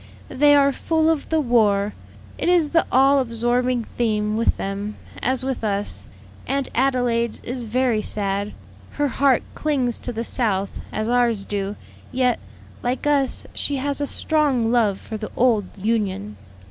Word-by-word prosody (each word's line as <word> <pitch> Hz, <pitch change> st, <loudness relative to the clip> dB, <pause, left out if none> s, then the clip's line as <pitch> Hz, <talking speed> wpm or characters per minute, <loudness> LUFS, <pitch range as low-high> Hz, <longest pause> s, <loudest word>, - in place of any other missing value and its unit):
"They 290 Hz, +2 st, +5 dB
are 280 Hz, -1 st, +5 dB
full 320 Hz, +3 st, +1 dB
of 315 Hz, -3 st, -2 dB
the 320 Hz, -, +2 dB
war; 210 Hz, -6 st, +2 dB, 0.5 s
it -, -, +1 dB
is 340 Hz, -4 st, +3 dB
the 330 Hz, -, +3 dB
all 270 Hz, +2 st, +5 dB
absorbing 240 Hz, 0 st, 0 dB
theme 215 Hz, -2 st, -1 dB
with 230 Hz, +1 st, +1 dB
them, 200 Hz, +2 st, -4 dB, 0.3 s
as 260 Hz, +1 st, +1 dB
with 265 Hz, -3 st, -3 dB
us. 205 Hz, -1 st, -2 dB, 0.4 s
Aunt 275 Hz, -1 st, -1 dB
Adelaide's 245 Hz, -3 st, +1 dB
is 245 Hz, -1 st, -4 dB
very 235 Hz, -1 st, +1 dB
sad. 200 Hz, -1 st, -2 dB, 0.4 s
Her 290 Hz, -1 st, 0 dB
heart 265 Hz, 0 st, +3 dB
clings 265 Hz, -6 st, -1 dB
to -, -, -5 dB
the 230 Hz, 0 st, -3 dB
South, 205 Hz, -6 st, -1 dB
as 215 Hz, 0 st, -2 dB
ours 235 Hz, -4 st, +2 dB
do; 200 Hz, 0 st, -3 dB, 0.4 s
yet, 250 Hz, -1 st, +1 dB, 0.4 s
like 250 Hz, +3 st, -2 dB
us, 280 Hz, -3 st, +2 dB
she 285 Hz, -, -2 dB
has 280 Hz, +1 st, -2 dB
a 285 Hz, -, 0 dB
strong 275 Hz, -9 st, +1 dB
love 215 Hz, -5 st, +2 dB
for 220 Hz, -, -6 dB
the 215 Hz, 0 st, -6 dB
old 230 Hz, -5 st, +3 dB
Union. 195 Hz, -, -1 dB
240 Hz, 155 wpm, -22 LUFS, 215-270 Hz, 0.5 s, They